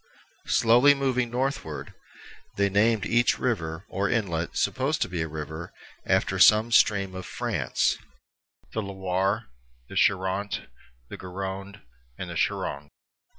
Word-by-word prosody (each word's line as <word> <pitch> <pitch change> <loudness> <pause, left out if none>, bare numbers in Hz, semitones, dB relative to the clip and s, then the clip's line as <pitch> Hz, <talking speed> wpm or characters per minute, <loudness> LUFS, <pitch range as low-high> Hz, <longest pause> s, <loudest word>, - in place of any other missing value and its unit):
Slowly 125 +5 +5
moving 130 -3 0
northward, 125 - -3 0.6
they 100 0 +2
named 105 0 +3
each 120 +2 +2
river, 85 -8 -2
or 100 0 -1
inlet 85 -8 -1
supposed 135 +5 0
to - - -4
be 85 -2 -3
a 80 - -1
river, 80 +2 -6 0.4
after - - +1
some 110 +2 +6
stream 100 -4 +3
of 95 0 -6
France, - - -1 0.7
the 110 - -1
Loire, 95 - -2 0.4
the - - -9
Charente, 95 +2 +1 0.4
the - - -7
Garonne, 95 +2 -6 0.3
the - - -6
Gironde. 70 +1 -2
100 Hz, 120 wpm, -26 LUFS, 90-115 Hz, 0.7 s, some